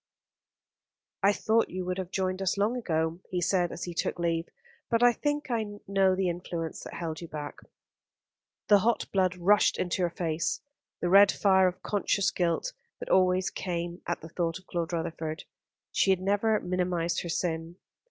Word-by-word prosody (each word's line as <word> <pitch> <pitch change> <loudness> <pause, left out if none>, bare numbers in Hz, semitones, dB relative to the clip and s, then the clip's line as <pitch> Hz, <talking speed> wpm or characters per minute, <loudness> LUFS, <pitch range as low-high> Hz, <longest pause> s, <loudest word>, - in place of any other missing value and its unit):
"I 200 - +5
thought 220 +2 +1
you 185 0 -4
would 180 +1 -2
have 185 -2 -4
joined 185 0 -1
us 190 +1 0
long 210 +5 +1
ago," 160 -7 -1
he 180 - -1
said, 175 0 +1
as - - -6
he 175 - -4
took 170 - -1
leave, 170 -1 -1 0.4
"but 230 0 +2
I 245 0 +7
think 290 +1 -2
I 215 -3 -2
know 195 -1 +3
the 190 0 0
influence 170 -2 -4
that - - -8
held 160 -2 -4
you 170 - -7
back." 150 -2 -7 1.1
The 205 -1 +7
hot 230 +4 +1
blood 185 -2 +2
rushed 190 +4 +3
into 180 +1 -1
her 175 - +2
face, 165 -1 -2 0.4
the 175 - 0
red 195 +1 +8
fire 190 -2 +4
of 180 - -4
conscious 200 -1 +1
guilt 175 - -1 0.3
that - - -7
always 185 0 +3
came 175 -1 -4
at 170 - -2
the 160 - -9
thought 165 0 -2
of 185 - -17
Claude 170 -1 -3
Rutherford. 165 -1 -3 0.5
She - - +2
had 190 -1 +4
never 205 +3 +2
minimised 180 -2 -1
her 170 - -6
sin. 165 0 -2
180 Hz, 180 wpm, -28 LUFS, 170-195 Hz, 1.1 s, red